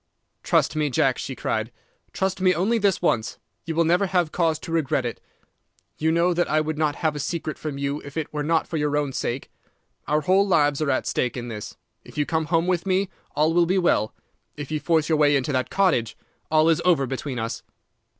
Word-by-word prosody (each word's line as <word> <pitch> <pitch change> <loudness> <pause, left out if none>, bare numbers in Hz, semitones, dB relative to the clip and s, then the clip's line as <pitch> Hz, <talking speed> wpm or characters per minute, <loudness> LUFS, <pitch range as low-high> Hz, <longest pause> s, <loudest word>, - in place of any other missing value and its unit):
"'Trust - - +2
me, 150 -1 +1
Jack!' 130 0 +1
she 135 - -5
cried. 110 0 -2 0.4
'Trust 190 0 -2
me 185 -1 +4
only 210 +8 +1
this 200 -4 +1
once. 110 -9 0 0.3
You 165 -1 -3
will 170 - +4
never 175 +4 +2
have 180 -4 +1
cause 165 -3 +1
to 165 - -9
regret 145 -5 0
it. 120 - -5 0.8
You 160 +1 +2
know 170 +2 +3
that 175 +1 0
I 155 - +3
would 155 0 -2
not 150 -2 +1
have 155 -1 +2
a - - -4
secret 155 +1 -3
from 150 -3 -4
you 140 +1 -2
if 140 +2 -9
it 155 -2 -3
were 150 - -2
not 160 +2 +1
for 165 - -3
your 150 -1 0
own 145 -2 -1
sake. 130 +1 -3 0.6
Our 150 +1 +2
whole 190 +5 +3
lives 145 -5 +2
are 155 - 0
at 130 - 0
stake 125 0 -1
in 120 0 -5
this. 105 -2 -7 0.3
If - - -14
you 150 - +1
come 160 0 -1
home 165 +1 +1
with 180 0 0
me, 190 0 +1 0.2
all 155 +2 +2
will 170 0 +3
be 185 +2 +2
well. 140 - +1 0.4
If 145 0 -6
you 155 - 0
force 155 0 +1
your 160 -2 +1
way 145 -1 +5
into 135 +1 0
that 130 -2 -1
cottage, 165 - +1 0.3
all 155 0 +4
is 165 0 +3
over 165 -7 +3
between 130 0 -4
us. 115 0 -3
155 Hz, 225 wpm, -24 LUFS, 140-170 Hz, 0.8 s, way